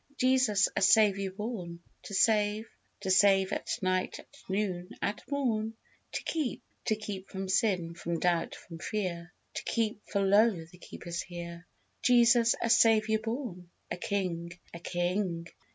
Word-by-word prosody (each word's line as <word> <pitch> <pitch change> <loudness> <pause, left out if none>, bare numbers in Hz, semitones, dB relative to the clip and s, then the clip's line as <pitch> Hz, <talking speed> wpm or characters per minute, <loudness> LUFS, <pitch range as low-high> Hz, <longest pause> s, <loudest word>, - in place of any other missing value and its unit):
Jesus 255 -6 +4
a - - 0
Saviour 195 -1 +4
born 190 -5 -5 0.3
To 200 - -5
save: 215 +1 +3 0.3
To 190 -1 -1
save 195 0 +5
at - - -2
night, 185 0 0
at - - -12 0.2
noon, 190 -2 -1
at 205 +1 -2
morn. 225 -6 -1 0.4
To - - -3
keep: 310 -7 -2 0.2
To 220 - +2
keep 205 -3 -7
from 190 -1 -5
sin, 185 -4 +1
from 170 0 -3
doubt, 175 -2 +1
from 165 -2 -11
fear; 175 -4 -3 0.2
To - - -4
keep, 220 -3 -1
for 200 - 0
lo! 200 -3 +4
the 175 +2 -18
Keeper's 170 -2 -6
here. 170 -1 -8 0.3
Jesus 235 -1 +5
a 230 - -1
Saviour 220 -1 +4
born, 225 -7 -5 0.2
A - - -2
King: 175 -3 -2 0.2
A 170 - -7
King! 175 0 -1
195 Hz, 150 wpm, -30 LUFS, 175-220 Hz, 0.4 s, save